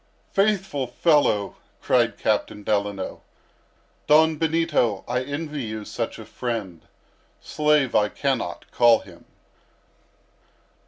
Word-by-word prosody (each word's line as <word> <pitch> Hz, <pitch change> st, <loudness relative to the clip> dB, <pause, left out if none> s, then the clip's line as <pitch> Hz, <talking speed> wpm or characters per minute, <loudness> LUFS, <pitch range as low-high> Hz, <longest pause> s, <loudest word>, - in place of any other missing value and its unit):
"Faithful 195 Hz, -9 st, +1 dB
fellow!" 120 Hz, -, +2 dB, 0.2 s
cried -, -, +1 dB
Captain 105 Hz, -, -1 dB
Delano. 100 Hz, -2 st, -2 dB, 0.9 s
"Don 160 Hz, +1 st, +5 dB
Benito, 155 Hz, -, 0 dB
I 125 Hz, +1 st, 0 dB
envy 145 Hz, +2 st, -4 dB
you 110 Hz, -2 st, -5 dB
such 115 Hz, +1 st, -4 dB
a 110 Hz, -, -10 dB
friend; 110 Hz, -8 st, -5 dB, 0.5 s
slave 150 Hz, -4 st, +1 dB
I 105 Hz, -1 st, +3 dB
cannot -, -, -3 dB
call 120 Hz, -2 st, +5 dB
him." -, -, -16 dB
125 Hz, 100 wpm, -24 LUFS, 105-150 Hz, 0.9 s, Don